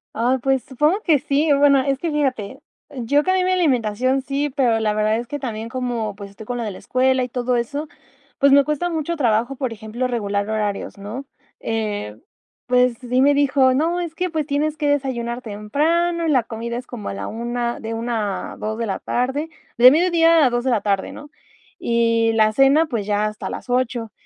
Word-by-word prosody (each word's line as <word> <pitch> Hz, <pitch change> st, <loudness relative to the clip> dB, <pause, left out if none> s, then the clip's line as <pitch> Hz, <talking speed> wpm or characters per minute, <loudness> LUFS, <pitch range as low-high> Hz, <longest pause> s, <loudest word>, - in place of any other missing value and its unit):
Ay, 245 Hz, +4 st, +1 dB
pues, 265 Hz, 0 st, 0 dB
supongo 300 Hz, -, +1 dB
que 310 Hz, -3 st, +4 dB
sí. 290 Hz, +2 st, +1 dB
O 280 Hz, -, +4 dB
bueno, 280 Hz, -1 st, +5 dB
es 275 Hz, 0 st, 0 dB
que 330 Hz, +2 st, -3 dB
fíjate, 265 Hz, -4 st, -2 dB, 0.4 s
yo 280 Hz, +5 st, +1 dB
cambié 370 Hz, 0 st, +2 dB
mi 370 Hz, -, +1 dB
alimentación, 255 Hz, -, +1 dB
sí, 280 Hz, +1 st, -2 dB
pero 240 Hz, -5 st, +2 dB
la 215 Hz, -1 st, 0 dB
verdad 215 Hz, +1 st, +1 dB
es 235 Hz, 0 st, -5 dB
que 290 Hz, -, -5 dB
también 230 Hz, -3 st, -5 dB
como, 240 Hz, -5 st, -3 dB
pues, 200 Hz, 0 st, -9 dB
estoy 210 Hz, +2 st, -12 dB
con 245 Hz, +1 st, -4 dB
lo 235 Hz, -, -3 dB
de 215 Hz, -, -3 dB
la -, -, -9 dB
escuela 260 Hz, 0 st, +1 dB
y 250 Hz, -, -4 dB
todo 250 Hz, 0 st, -1 dB
eso, 285 Hz, +6 st, -2 dB, 0.5 s
pues, 280 Hz, 0 st, +4 dB
me 280 Hz, 0 st, +7 dB
cuesta 300 Hz, +4 st, -1 dB
mucho 325 Hz, +1 st, -2 dB
trabajo, 240 Hz, +1 st, +1 dB
por 255 Hz, -3 st, -3 dB
ejemplo, 225 Hz, +4 st, -4 dB
regular 205 Hz, -4 st, -2 dB
horarios, 210 Hz, -2 st, -3 dB
¿no? 225 Hz, +8 st, -7 dB, 0.3 s
Eh, 210 Hz, -, -3 dB, 0.5 s
pues, 250 Hz, -1 st, +3 dB
sí 250 Hz, +1 st, 0 dB
me 285 Hz, +1 st, +5 dB
dijo: 270 Hz, -2 st, +3 dB
"No, 330 Hz, +6 st, 0 dB
es 340 Hz, -2 st, -4 dB
que, 365 Hz, +1 st, -2 dB
pues, 315 Hz, -3 st, -2 dB
tienes 300 Hz, +1 st, -1 dB
que 295 Hz, -, -1 dB
desayunar 250 Hz, -4 st, -1 dB
temprano, 320 Hz, +11 st, 0 dB
la 260 Hz, -6 st, +3 dB
comida 235 Hz, +1 st, -5 dB
es 250 Hz, -, -6 dB
como 225 Hz, -5 st, -7 dB
a -, -, -4 dB
la -, -, -5 dB
1 235 Hz, +1 st, -3 dB
de 225 Hz, 0 st, -5 dB
1 225 Hz, -4 st, -3 dB
a -, -, -13 dB
2 220 Hz, +1 st, -4 dB
de 230 Hz, -, -2 dB
la 195 Hz, -, -3 dB
tarde, 265 Hz, +6 st, -2 dB, 0.3 s
de 250 Hz, -, +10 dB
mediodia 330 Hz, -1 st, +4 dB
a -, -, +4 dB
2 240 Hz, 0 st, -1 dB
de 260 Hz, -, 0 dB
la 220 Hz, -, +1 dB
tarde, 200 Hz, -2 st, -1 dB
¿no? 295 Hz, 0 st, -11 dB, 0.5 s
Y 230 Hz, -1 st, +2 dB
la 215 Hz, -1 st, +3 dB
cena, 275 Hz, +6 st, +4 dB
pues, 225 Hz, -8 st, -4 dB
ya 210 Hz, 0 st, +1 dB
hasta 215 Hz, 0 st, -4 dB
las -, -, -7 dB
8". 245 Hz, -3 st, -1 dB
250 Hz, 210 wpm, -21 LUFS, 225-285 Hz, 0.5 s, de